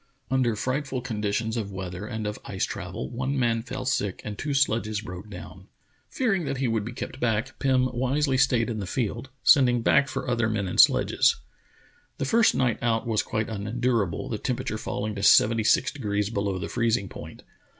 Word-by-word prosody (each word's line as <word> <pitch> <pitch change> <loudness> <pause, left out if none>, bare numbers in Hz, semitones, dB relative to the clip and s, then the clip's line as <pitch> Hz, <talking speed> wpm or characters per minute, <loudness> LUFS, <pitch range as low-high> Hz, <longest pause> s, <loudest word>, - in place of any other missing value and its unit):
Under 125 -4 +2
frightful 130 +3 -2
conditions 110 -1 -2
of 100 -3 -3
weather 95 +1 -6
and 110 -3 -4
of 105 0 -4
ice - - -2
travel 65 - -5
one 130 +3 -2
man 115 -3 +1
fell 130 +2 -6
sick 100 -7 -1
and 105 - -4
two 145 +6 -3
sledges 110 -6 +1
broke 90 +1 -8
down. 90 0 -10 0.4
Fearing 210 -9 0
that 135 - -2
he 130 -1 0
would 115 -2 0
be 115 - -6
kept 130 +1 -7
back, 115 +2 -1
Pim 130 -2 +3
wisely 130 +3 +1
stayed 125 -3 +3
in 115 -3 -3
the 95 - -4
field, 120 +3 -3
sending 125 -4 +5
back 140 - +4
for - - -4
other 120 -3 +1
men 105 -3 -1
and 90 - -3
sledges. - - +5 0.8
The - - -2
first 225 - +4
night 125 -3 +1
out 115 -1 0
was 110 -3 +1
quite 110 +1 -2
unendurable, 110 -2 -1
the 110 - -3
temperature 125 -4 -3
falling 105 0 -3
to 100 - -5
seventy 110 +2 +5
six - - +3
degrees 105 -5 -2
below 100 -3 -1
the - - -4
freezing 115 -4 0
point. - - -10
115 Hz, 190 wpm, -26 LUFS, 105-130 Hz, 0.8 s, sending